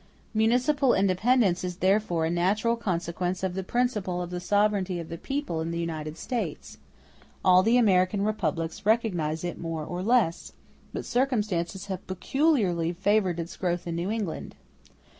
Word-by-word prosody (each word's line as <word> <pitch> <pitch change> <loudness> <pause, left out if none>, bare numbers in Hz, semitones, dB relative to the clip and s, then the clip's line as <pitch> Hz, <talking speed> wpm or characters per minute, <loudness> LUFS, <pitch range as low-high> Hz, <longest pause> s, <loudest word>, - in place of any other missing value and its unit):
Municipal 250 +5 +3
independence 195 0 +2
is 180 -1 -4
therefore 190 -3 +2
a 165 - 0
natural 200 +7 +1
consequence 180 -3 -2
of 185 -1 -1
the 190 - -2
principle 210 -5 -1
of 175 0 -4
the 180 - -3
sovereignty 200 -1 +1
of 165 - -7
the 170 - -5
people 270 - -3
in 165 - -3
the 170 - -3
United 160 -2 -4
States: 245 +4 -4 0.7
all 185 -1 +7
the 225 +5 +3
American 195 -3 +3
republics 165 -6 -2
recognize 180 -8 +1
it 175 - -4
more 165 -2 -4
or 175 +2 -4
less; 215 -5 +1 0.4
but - - -5
circumstances 210 -8 -1
have 190 -2 -6
peculiarly 185 - +1
favored 190 -1 +1
its 170 +2 -5
growth 175 -1 -2
in 170 -1 -3
New 170 +3 -2
England. 210 -7 -4
185 Hz, 155 wpm, -27 LUFS, 170-215 Hz, 0.7 s, all